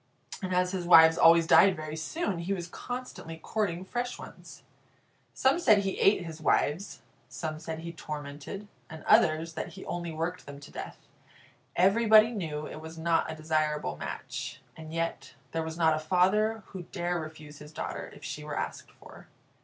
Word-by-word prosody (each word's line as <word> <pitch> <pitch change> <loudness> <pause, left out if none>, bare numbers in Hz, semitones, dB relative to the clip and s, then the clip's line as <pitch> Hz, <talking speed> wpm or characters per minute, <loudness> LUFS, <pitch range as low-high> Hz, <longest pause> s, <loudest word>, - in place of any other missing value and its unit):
And 185 -1 -3
as 180 0 +2
his 180 -3 -3
wives 160 -2 +8
always 165 0 +6
died 190 +3 +6
very 155 -1 -6
soon, 185 - -2
he 175 +4 -2
was 175 -2 -5
constantly 245 -6 -7
courting 185 0 -2
fresh 245 +4 -3
ones. - - -12 0.7
Some 265 +5 +3
said 215 -11 +5
he 195 -1 -2
ate 195 -3 +4
his 160 -1 -8
wives; 155 +5 0 0.3
some 155 +5 -5
said 160 0 -6
he 170 0 -6
tormented, 150 +5 -7 0.2
and 160 0 -9
others, 160 +1 +4
that 160 - -5
he 190 - -10
only 175 -1 -4
worked 165 +2 -4
them 140 0 -9
to 145 - -12
death. - - -7 0.8
Everybody 215 +4 +6
knew 155 -9 -4
it 155 - -8
was 160 +1 -9
not 165 0 +1
a - - -6
desirable 155 - -1
match, - - -6 0.2
and 160 -1 -10
yet 165 0 -3 0.2
there 165 - -1
was 160 0 -5
not 160 -2 +4
a - - -2
father 195 +7 +2
who 190 - -7
dare 175 0 -3
refuse 155 -2 -9
his 150 0 -11
daughter 155 - -5
if - - -15
she 150 - -5
were 150 -1 -5
asked - - -4
for. - - -15
165 Hz, 175 wpm, -29 LUFS, 155-190 Hz, 0.8 s, wives